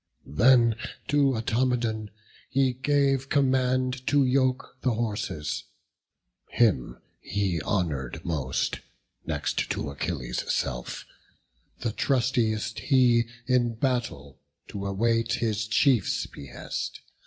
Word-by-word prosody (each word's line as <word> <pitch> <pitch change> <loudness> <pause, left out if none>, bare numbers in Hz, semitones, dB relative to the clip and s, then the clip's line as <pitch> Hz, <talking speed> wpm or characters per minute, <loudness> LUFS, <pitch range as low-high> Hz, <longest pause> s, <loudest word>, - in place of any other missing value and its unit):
Then 115 - +4 0.3
to 140 -2 +3
Automedon 115 -2 0 0.4
he 135 -1 +2
gave 135 0 +1
command 130 -2 +1
To 145 -1 +4
yoke 130 0 +1
the 125 -3 +1
horses: 100 -9 -3 0.8
him 105 - +2 0.2
he 95 -5 -1
honour'd 75 - -2
most, 70 -6 -1 0.5
Next - - -1
to - - -2
Achilles' 70 -4 -3
self; - - -3 0.8
the 115 - -1
trustiest 115 -4 0
he 125 -3 +4 0.2
In 120 -2 +2
battle 115 - -2 0.3
to 100 -1 -4
await 115 +3 +1
his 110 -3 -1
chief's 115 -1 +2
behest. 70 -1 -6
115 Hz, 95 wpm, -27 LUFS, 100-130 Hz, 0.8 s, Then